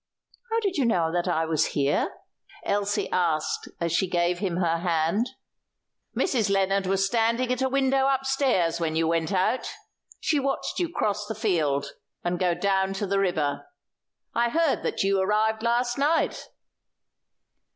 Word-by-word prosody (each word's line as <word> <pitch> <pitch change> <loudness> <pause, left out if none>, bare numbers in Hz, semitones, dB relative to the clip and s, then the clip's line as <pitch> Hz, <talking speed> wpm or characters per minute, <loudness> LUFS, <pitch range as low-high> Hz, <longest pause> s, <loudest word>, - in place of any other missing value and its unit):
"How 455 +1 +1
did 395 -4 -1
you 275 - +2
know 170 -8 +2
that 175 +1 0
I 165 -2 +1
was 160 -1 +1
here?" 140 0 +1 0.6
Elsie 205 0 0
asked 165 -4 0
as 170 -1 -1
she 185 +2 +1
gave 175 0 +1
him 180 -3 -2
her 170 -2 +1
hand. 170 +6 0 0.9
"Mrs. 235 - +1
Lennard 195 0 +1
was 195 0 +2
standing 230 +4 +1
at 250 - -4
a 265 - +2
window 270 0 +2
upstairs 265 -11 +1
when 160 -2 -1
you 165 0 +1
went 165 +1 0
out. 190 +7 0 0.5
She 310 -2 +1
watched 275 0 -2
you 350 -2 0
cross 210 -8 -1
the 220 - -4
field 155 -10 0 0.3
and 175 0 -1
go 180 -2 +2
down 195 0 +1
to 195 +1 -2
the 195 0 0
river. 160 - -1 0.7
I 235 0 +2
heard 325 +2 +1
that - - -1
you 195 0 +2
arrived 215 +3 +1
last 240 +2 0
night." 300 +4 +1
195 Hz, 160 wpm, -26 LUFS, 175-245 Hz, 0.9 s, you